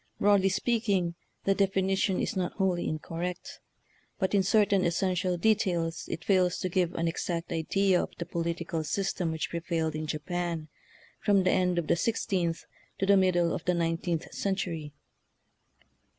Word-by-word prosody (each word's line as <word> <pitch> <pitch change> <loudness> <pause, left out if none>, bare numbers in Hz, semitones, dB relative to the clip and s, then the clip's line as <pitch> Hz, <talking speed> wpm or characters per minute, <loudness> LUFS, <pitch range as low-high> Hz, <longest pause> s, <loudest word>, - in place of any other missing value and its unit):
Broad 205 -1 +5
ly 190 - +3
speaking, 200 -4 +1 0.3
the 195 - +3
definition 195 -1 +1
is - - -1
not 185 -2 -1
wholly 185 -3 0
incorrect, 170 +3 -5 0.6
but 190 -1 -1
in 200 - +5
certain 200 0 +3
essential 180 +1 0
details 175 -5 +1
it 165 - -5
fails 185 -3 +3
to 185 - -2
give 180 -1 0
an 165 - 0
exact 170 +1 -3
idea 180 +3 +2
of - - -4
the 170 - -4
politi 170 0 -3
cal 160 -1 -2
system 180 +1 -1
which 160 -1 -3
prevailed 165 -2 -1
in 155 0 -4
Japan 165 +1 -3 0.5
from 200 -2 +3
the 185 - +3
end 180 -1 +2
of 170 - 0
the - - +2
sixteenth 180 -4 -1 0.3
to 195 - 0
the 200 +1 +5
middle 180 -3 +3
of - - -4
the 180 - +2
nineteenth 165 0 -1
century. 170 -6 -2
180 Hz, 160 wpm, -29 LUFS, 165-195 Hz, 0.6 s, Broad